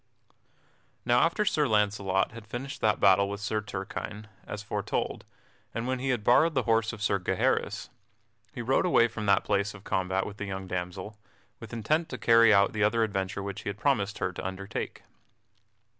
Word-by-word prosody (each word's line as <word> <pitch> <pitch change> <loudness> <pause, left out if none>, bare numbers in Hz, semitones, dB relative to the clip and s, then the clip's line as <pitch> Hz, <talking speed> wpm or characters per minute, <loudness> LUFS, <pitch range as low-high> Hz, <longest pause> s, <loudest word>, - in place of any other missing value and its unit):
_ - - -33 0.7
Now 120 0 +4
after 170 +9 +2
Sir 150 -6 +2
Launcelot 100 -3 +1
had 110 -1 -11
finished 130 +5 -6
that 110 -1 +2
battle 100 0 +5
with 100 0 -4
Sir 105 +1 -1
Turquine 105 +1 -6 0.2
as 105 0 -6
aforetold, 105 - -3 0.5
and 115 - -2
when 130 0 -1
he 135 +1 -2
had 120 -5 0
borrowed 155 +8 +4
the 130 - +2
horse 115 0 +2
of 110 -3 -7
Sir 100 -1 +2
Gaheris, 90 - -1 0.6
he 120 - -6
rode 135 +9 +2
away 120 -9 +5
from 110 -2 -5
that 100 -1 +4
place 100 0 0
of 100 - -13
combat 95 +1 -1
with 105 - -8
the 100 - -4
young 95 -1 -5
damsel, 90 +3 -5 0.4
with - - -10
intent 155 +9 0
to 125 - -5
carry 115 -1 +6
out 100 -1 +4
the 105 - -2
other 115 +2 +3
adventure 95 -2 -2
which 100 -1 -5
he - - -4
had 100 - -5
promised 105 -4 0
her 90 - -2
to - - -6
undertake. 95 +1 -5
105 Hz, 190 wpm, -28 LUFS, 100-115 Hz, 0.7 s, carry